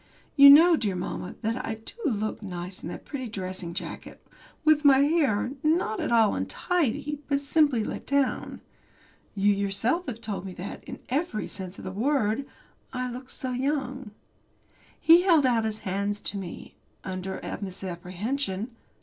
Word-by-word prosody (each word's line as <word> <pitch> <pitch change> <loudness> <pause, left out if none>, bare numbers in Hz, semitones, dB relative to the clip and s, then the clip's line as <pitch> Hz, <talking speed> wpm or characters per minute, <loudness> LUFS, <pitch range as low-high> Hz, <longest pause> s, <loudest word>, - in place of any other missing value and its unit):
You 280 -1 +10
know, 330 +5 +9
dear 205 -10 -1
mamma, 180 0 -5
that 230 +4 -1
I 225 - -3
do 220 0 -9
look 215 -7 -1
nice 180 -2 -6
in - - -6
that - - -8
pretty 260 -4 -5
dressing 185 -4 -5
jacket, - - -7 0.4
with 310 -1 +5
my 280 -2 +7
hair, 280 -7 +2
not 310 -8 +1
at - - -2
all 225 -3 +5
untidy, 295 -4 -1
but 280 -1 +1
simply 285 -4 +2
let - - -6
down. 280 -2 0 0.7
You 205 +1 +3
yourself 200 - 0
have 235 -3 -4
told 210 -5 -4
me 190 -1 -7
that, 185 +2 -7
in - - -8
every 270 -4 -1
sense 185 -2 -6
of - - -10
the 185 - -4
word, 240 +3 0 0.4
I 255 -1 -3
look 255 +1 -8
so 255 - -3
young. 265 -1 -2 0.9
He 335 +2 +7
held 335 -6 +4
out 235 -3 +2
his 215 -1 -2
hands 200 +2 -1
to 205 - -3
me 180 -3 -9 0.3
under 190 0 -4
a - - -6
misapprehension. 190 +5 -3
230 Hz, 160 wpm, -27 LUFS, 195-280 Hz, 0.9 s, You